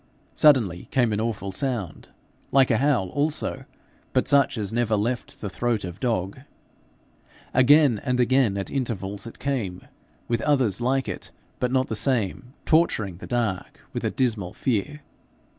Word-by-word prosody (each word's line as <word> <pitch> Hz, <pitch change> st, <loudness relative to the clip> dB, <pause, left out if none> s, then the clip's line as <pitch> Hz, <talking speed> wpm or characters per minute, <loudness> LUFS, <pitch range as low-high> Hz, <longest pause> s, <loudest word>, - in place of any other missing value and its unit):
Suddenly 115 Hz, -, +3 dB
came 120 Hz, -4 st, +2 dB
an 105 Hz, -, 0 dB
awful 105 Hz, -4 st, -3 dB
sound 105 Hz, -, -4 dB, 0.4 s
like 135 Hz, -2 st, +4 dB
a 115 Hz, -, +3 dB
howl 130 Hz, -9 st, +2 dB
also, 145 Hz, -, -1 dB, 0.5 s
but -, -, +2 dB
such 140 Hz, -3 st, +3 dB
as 105 Hz, -1 st, -3 dB
never 115 Hz, -2 st, +1 dB
left 120 Hz, +4 st, -3 dB
the 105 Hz, -, -3 dB
throat 115 Hz, +2 st, -1 dB
of 90 Hz, +1 st, -8 dB
dog. 110 Hz, -5 st, -1 dB, 1.1 s
Again 130 Hz, -3 st, +5 dB
and 125 Hz, -2 st, 0 dB
again 125 Hz, -4 st, +3 dB
at 100 Hz, -, -4 dB
intervals 105 Hz, -6 st, -3 dB
it 115 Hz, -, -10 dB
came, 115 Hz, -10 st, -3 dB, 0.4 s
with 115 Hz, -1 st, 0 dB
others 125 Hz, -8 st, +1 dB
like 130 Hz, +2 st, +1 dB
it -, -, -5 dB, 0.3 s
but 125 Hz, -1 st, 0 dB
not 130 Hz, 0 st, +2 dB
the 110 Hz, -, -4 dB
same, 125 Hz, +1 st, -1 dB
torturing 110 Hz, -, +2 dB
the -, -, -10 dB
dark 115 Hz, -6 st, -2 dB
with -, -, -4 dB
a -, -, +1 dB
dismal 110 Hz, -8 st, -1 dB
fear. 135 Hz, +5 st, -2 dB
120 Hz, 155 wpm, -25 LUFS, 100-130 Hz, 1.1 s, Again